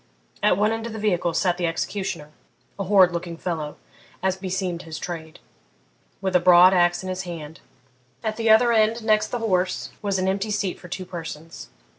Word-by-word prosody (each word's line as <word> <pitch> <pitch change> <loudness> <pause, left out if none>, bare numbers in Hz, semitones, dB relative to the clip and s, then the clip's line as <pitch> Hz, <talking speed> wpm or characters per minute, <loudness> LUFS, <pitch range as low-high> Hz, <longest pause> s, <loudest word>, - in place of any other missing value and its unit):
At 210 -3 +3
one 210 +2 +2
end 225 0 -3
of 230 - -7
the - - -5
vehicle 180 -5 +1
sat 175 -1 +1
the 175 - +1
executioner, 165 -2 -3 0.5
a 195 - -2
horrid 190 -2 +5
looking 170 -1 -5
fellow, 160 -4 -4 0.5
as 190 -1 +2
beseemed 185 -2 -3
his 160 -2 -7
trade, 160 -2 -6 0.8
with 190 -1 -1
the 180 - +5
broad 180 +1 +7
axe 175 0 +3
in 185 - -5
his 185 0 -3
hand; 165 -4 -8 0.6
at 220 -1 -1
the 225 0 0
other 230 +2 +6
end, 225 +1 +2
next 215 -1 +3
the 245 - -3
horse, 185 -5 -1
was 200 -2 0
an 185 0 0
empty 195 +3 -1
seat 205 -3 -2
for 180 - -11
two 185 +1 -5
persons. 165 -2 -8
185 Hz, 190 wpm, -24 LUFS, 175-210 Hz, 0.8 s, broad